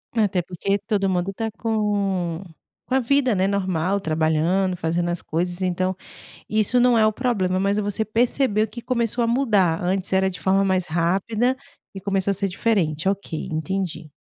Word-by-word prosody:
Até 205 -5 +2
porque 185 +3 -2
todo 200 -1 0
mundo 185 +1 -1
tá 225 +3 -3
com 200 -6 -1 0.4
com 260 - -1
a - - +4
vida, 260 -2 +2
né, 190 +1 +2
normal, 190 -1 0
trabalhando, 160 +3 +1
fazendo 170 +1 -1
as 175 0 -2
coisas. 175 +3 -2
Então 185 +1 0 0.5
isso 215 +3 +1
não 245 -1 +4
é 215 - +5
o 215 - +2
problema, 205 -6 0
mas 200 +2 +1
você 205 +1 -1
percebeu 225 -1 +1
que 235 +3 -9
começou 235 -1 0
a - - +1
mudar 210 -9 +2
antes 185 +1 -1
era 190 0 +3
de 185 - -6
forma 195 +1 +2
mais 185 -2 +1
rápida, 195 +10 0 0.4
e 195 - -6
começou 195 0 0
a - - +1
ser 195 +1 -1
diferente. 180 -4 0
Ok, 195 -5 -3
entendi. 165 -1 -3
195 Hz, 175 wpm, -23 LUFS, 180-215 Hz, 0.5 s, é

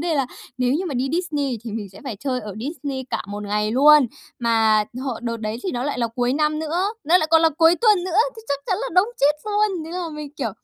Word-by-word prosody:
đề 335 0 0
là 275 -3 +1 0.3
nếu 250 0 +2
như 330 +7 0
mà 300 - -4
đi 255 +2 0
Disney 295 -8 -1
thì 230 - -5
mình 210 -2 -4
sẽ - - -13
phải 245 -6 -5
chơi 260 -3 -1
ở 210 -3 -7
Disney 275 -1 -4
cả - - -1
một 205 +1 -5
ngày 210 +1 0
luôn. 290 +1 +7 0.3
Mà 220 -2 +3 0.2
hộ 265 -3 -2
đợt 230 -1 -2
đấy 215 0 -4
thì 380 - -2
nó 245 +1 -2
lại 290 -2 -2
là 235 - +1
cuối 245 0 +1
năm 305 +1 +1
nữa, 320 +3 -1 0.2
nó 335 +5 +5
lại 310 - -1
còn 325 0 +6
là 325 - +6
cuối 330 +1 +6
tuần 420 -6 +4
nữa, 365 -1 -2 0.2
thì 450 - -10
chắc 280 - 0
chắn 380 - 0
là - - -3
đông 365 +4 +4
chết 290 +2 +4
luôn! 415 -5 0
Thế 320 - -8
là 355 -1 -3
mình, 300 -1 -7
kiểu, - - -2
285 Hz, 265 wpm, -22 LUFS, 240-335 Hz, 0.3 s, luôn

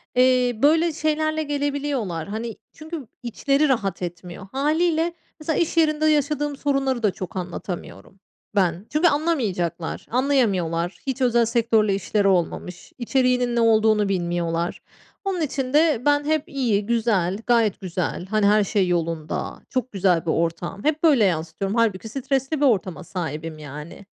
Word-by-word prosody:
Eee, 250 -2 +3
böyle 325 +3 +4
şeylerle 310 0 0
gelebiliyorlar, 285 - -2
hani, 220 +2 -4 0.2
çünkü 310 -4 -8 0.2
içleri 275 +5 +1
rahat 200 -9 0
etmiyor. 175 +1 -7
Hâliyle 320 +4 +1 0.3
mesela 310 0 -1
iş 335 0 0
yerinde 310 -1 +3
yaşadığım 295 -1 +1
sorunları 270 -3 0
da 210 - +3
çok 185 0 -7
anlatamıyorum 180 +1 -6 0.4
ben 180 -1 +1
çünkü 305 +4 +3
anlamayacaklar, 225 - -1
anlayamıyorlar. 195 -10 +1
Hiç 265 0 -2
özel 240 -2 +3
sektörle 225 -3 +2
işleri 200 +1 0
olmamış, 180 -1 -1
içeriğinin 250 -1 +1
ne - - +2
olduğunu 220 -2 +3
bilmiyorlar. 170 -2 -1 0.4
Onun 380 -3 -1
için 270 -3 -2
de 305 -5 +4
ben 290 0 +3
hep 310 -1 +1
"İyi, 235 -7 0
güzel, 210 -5 +1
gayet 230 -5 +2
güzel. 180 -1 -3
Hani, 215 +1 +1
her 210 +1 +5
şey 195 -1 +1
yolunda. 165 -3 -2
Çok 255 -1 -2
güzel 180 -4 +1
bir 165 - +1
ortam." 170 +4 -2
Hep 305 +1 0
böyle 280 -10 +5
yansıtıyorum. 170 +3 -1
Hâlbuki 220 -2 +1
stresli 270 +3 -1
bir - - +5
ortama 185 - +1
sahibim, 160 -3 -5
yani. 150 +6 -9
230 Hz, 140 wpm, -23 LUFS, 185-285 Hz, 0.4 s, her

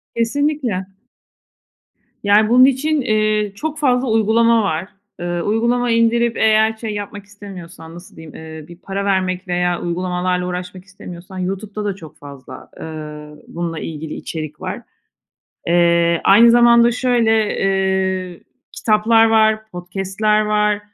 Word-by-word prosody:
Kesinlikle 235 -4 -1 1.4
Yani, 210 +2 +4
bunun 255 +2 +7
için, 285 +3 +1
eee, 215 -3 0
çok 310 +7 -5
fazla 255 -3 +1
uygulama 225 +1 +3
var. 175 -1 -2 0.3
Eee, 175 0 -3
uygulama 235 +5 0
indirip 230 0 +2
eğer 220 0 +3
şey 220 -1 -5
yapmak 205 0 -7
istemiyorsan, 180 -5 -12
nasıl 175 +1 -14
diyeyim, 160 -1 -12
eee, 160 -1 -10
bir 175 - -13
para 195 +2 -5
vermek 185 -1 -1
veya 175 0 -1
uygulamalarla 180 +1 -2
uğraşmak 180 +1 -6
istemiyorsan 185 -1 -11
YouTube'da 200 +3 -4
da 200 - -2
çok 160 -6 -13
fazla, 140 -2 -12
eee, 150 -1 -9
bununla 165 -1 -5
ilgili 155 -1 -6
içerik 155 -2 -7
var. - - -5 0.9
Eee, 170 0 +2
aynı 230 +4 +7
zamanda 235 0 +5
şöyle, 230 -4 +1
eee, 190 -2 -1 0.3
kitaplar 225 +1 +3
var, 220 -1 +2
podcast'ler 195 +4 -1
var. 210 -1 +1
200 Hz, 125 wpm, -18 LUFS, 175-225 Hz, 1.4 s, bunun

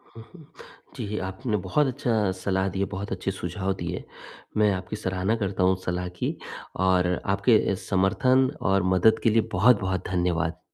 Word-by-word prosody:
हुँ, 115 - -10
हुँ। 160 -4 -14 0.5
जी, 105 -4 -4
आपने 105 +4 -2
बहुत 145 +10 +2
अच्छा 115 -5 0
सलाह 95 0 0
दी 95 - -5
है, 100 - +2
बहुत 100 +1 -5
अच्छे 95 0 -2
सुझाव 95 +1 -3
दिए। 85 +1 -4 0.5
मैं 105 -1 +4
आपकी 95 +2 -5
सराहना 95 +1 -1
करता 95 -1 -1
हूँ 95 +1 +4
सलाह 90 0 -2
की - - -1 0.5
और 90 -1 +3 0.2
आपके 100 0 +3
समर्थन 130 +7 +3 0.2
और 95 -1 +3
मदद 110 +5 +4
के - - +5
लिए 115 +1 +4
बहुत-बहुत 95 -2 +2
धन्यवाद। 85 -3 0
95 Hz, 160 wpm, -26 LUFS, 90-110 Hz, 0.5 s, के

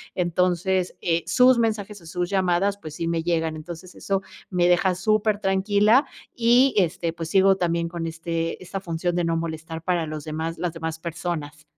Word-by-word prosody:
Entonces, 180 +1 +1
eh, 170 -1 +1
sus 255 0 +5
mensajes 215 -3 -1
o 165 - -16
sus 175 +1 -3
llamadas, 190 +1 +1
pues, 155 -5 -9
sí 165 - -3
me 165 -1 0
llegan. 165 -2 0
Entonces, 175 +1 -9
eso 195 -1 -1 0.3
me 175 -1 +3
deja 180 +1 +3
súper 215 +2 +1
tranquila 205 +6 +3 0.3
y, 245 +3 +4
este, 170 -2 +1
pues, 165 -1 -6
sigo 195 0 +5
también 170 -2 0
con 170 -1 -4
este 165 +1 -3
esta 195 +2 -5
función 175 -1 -2
de 175 - +1
no 165 0 0
molestar 160 0 -5
para 175 -2 0
los 155 -1 -6
demás 160 +1 -3
las 175 -2 -1
demás 160 -1 -4
personas. 160 -3 -5
175 Hz, 180 wpm, -24 LUFS, 165-195 Hz, 0.3 s, sus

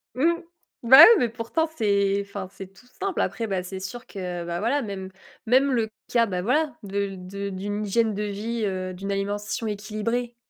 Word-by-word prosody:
mmh, 320 +6 +3 0.5
bah, 250 +3 +8
oui, 450 - +11
mais 240 - +1
pourtant 240 +8 -2
c'est 200 -2 +2
enfin 200 -1 -6
c'est 195 -1 -10
tout 250 +5 -20
simple. 390 -2 -1
Après 230 -2 -2
bah, 190 -3 -1
c'est 190 +1 -6
sûr 240 +6 -7
que, 180 -3 -5
bah, 170 0 -3
voilà, 260 +7 +1
même 195 -4 -6 0.4
même 265 +4 +4
le 230 -4 +1 0.2
cas, 235 -1 +4
bah, 185 -4 -3
voilà, 290 - +1
de 200 -1 -2
de 200 +2 -6
d'une 205 +2 -3
hygiène 220 +2 +1
de 210 +1 -3
vie, 215 +3 -3
heu, 185 -1 -3
d'une 195 +2 -5
alimentation 205 +3 -2
équilibrée. 215 +4 -3
205 Hz, 190 wpm, -25 LUFS, 195-235 Hz, 0.5 s, oui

